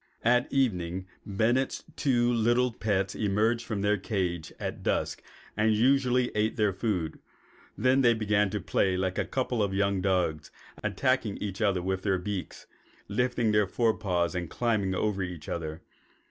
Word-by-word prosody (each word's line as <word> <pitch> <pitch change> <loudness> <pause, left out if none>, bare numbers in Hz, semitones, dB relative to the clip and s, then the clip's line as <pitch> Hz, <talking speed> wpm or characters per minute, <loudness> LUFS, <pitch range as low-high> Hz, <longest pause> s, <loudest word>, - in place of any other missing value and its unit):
At 125 +2 +3
evening 95 -9 0 0.2
Bennett's 115 +6 +1
two 120 -3 +2
little 120 +2 +2
pets 100 -3 0
emerged 110 +3 +1
from 105 -3 -2
their 105 0 +2
cage 90 -5 -2
at - - -4
dusk - - -1 0.3
and 110 0 +3
usually 125 +1 +3
ate 105 +1 0
their 105 -3 +2
food; 90 -6 -2 0.6
then 130 +4 +3
they 120 -2 +5
began 105 -2 +1
to 105 - -2
play 95 +1 +1
like 95 0 -1
a - - 0
couple 125 -3 -1
of 100 -2 0
young 100 -1 +1
dogs, 90 -5 0 0.3
attacking 130 -6 0
each 100 0 -5
other 95 -4 +2
with 95 0 -1
their 95 -1 +1
beaks, 95 0 -5 0.4
lifting 120 +1 +1
their 105 -1 +3
fore 115 +3 +2
paws 90 -5 0
and 90 -3 -3
climbing 105 -6 0
over 100 0 0
each 90 -4 -5
other. 80 -2 -4
105 Hz, 160 wpm, -28 LUFS, 95-120 Hz, 0.6 s, they